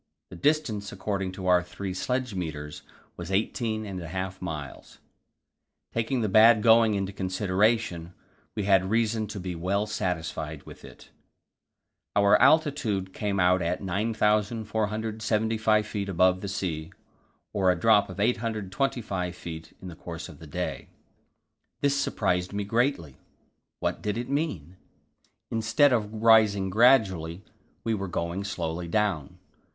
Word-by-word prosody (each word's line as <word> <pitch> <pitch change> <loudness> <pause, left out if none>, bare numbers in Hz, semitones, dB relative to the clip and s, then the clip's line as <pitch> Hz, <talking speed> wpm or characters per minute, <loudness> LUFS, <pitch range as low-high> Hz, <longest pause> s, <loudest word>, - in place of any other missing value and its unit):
The - - -8
distance 115 - 0
according 95 -1 -3
to 95 -1 -7
our 90 -1 +5
three 95 +2 -6
sledge 125 +4 -2
meters 75 -5 -5 0.4
was 85 0 -6
eighteen 110 +2 -1
and 95 -3 -5
a 85 - -7
half 95 +2 -5
miles; 75 -6 -7 1.0
taking 115 +2 0
the 110 - +1
bad 110 +2 +6
going 115 -2 +5
into 95 0 -2
consideration, 95 -1 0 0.4
we 105 - -2
had 95 -1 +3
reason 110 0 +1
to 105 0 -6
be 90 -1 -4
well 95 +5 -1
satisfied 80 -7 -3
with - - -13
it. - - -14 1.0
Our 100 0 +5
altitude 130 - +2
came 100 -2 -2
out 90 0 +4
at 90 +4 -2
9,475 110 +1 0
feet 100 -2 -4
above 90 0 +3
the 100 - -4
sea, 85 -5 -3 0.6
or 95 -2 +2
a 90 -1 +2
drop 105 -1 +4
of 95 - -8
825 105 -4 -1
feet 80 -2 -8
in - - -7
the 85 - -8
course 85 -1 -7
of - - -13
the 80 - -11
day. 75 - -4 0.9
This 140 0 +2
surprised 90 -9 0
me 100 0 -2
greatly. 105 - -1 0.6
What - - -2
did 105 +1 -2
it 120 +1 -4
mean? 100 - -3 0.7
Instead 115 +5 +3
of 105 -3 0
rising 105 -4 +5
gradually, 100 -7 +3 0.4
we 115 - 0
were 100 -2 -3
going 85 +2 -3
slowly 90 -3 -4
down. 95 -7 -1
100 Hz, 135 wpm, -27 LUFS, 90-110 Hz, 1.0 s, bad